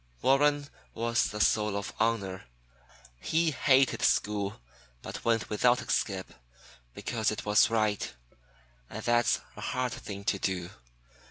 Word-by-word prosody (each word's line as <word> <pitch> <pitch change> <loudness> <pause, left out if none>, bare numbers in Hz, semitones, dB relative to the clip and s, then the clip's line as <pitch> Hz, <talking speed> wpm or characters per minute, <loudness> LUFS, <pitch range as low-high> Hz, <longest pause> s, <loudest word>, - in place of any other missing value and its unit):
Warren 145 +2 +3 0.3
was 115 +1 +1
the 105 - -4
soul 105 -1 +2
of 100 - -5
honor. 100 -4 -1 0.7
He 160 - +1
hated 135 -1 +3
school, 100 0 +1 0.4
but - - -7
went 115 -1 +1
without 120 +3 +3
a 120 - -5
skip, 95 -3 -1 0.6
because 110 -3 -1
it 105 - -4
was 105 +2 +5
right. 110 -2 0 0.8
And 110 - -7
that's 120 0 +2
a - - -9
hard 125 -1 -1
thing 100 -3 -7
to 100 0 0
do. 90 -2 -2
110 Hz, 135 wpm, -29 LUFS, 100-120 Hz, 0.8 s, was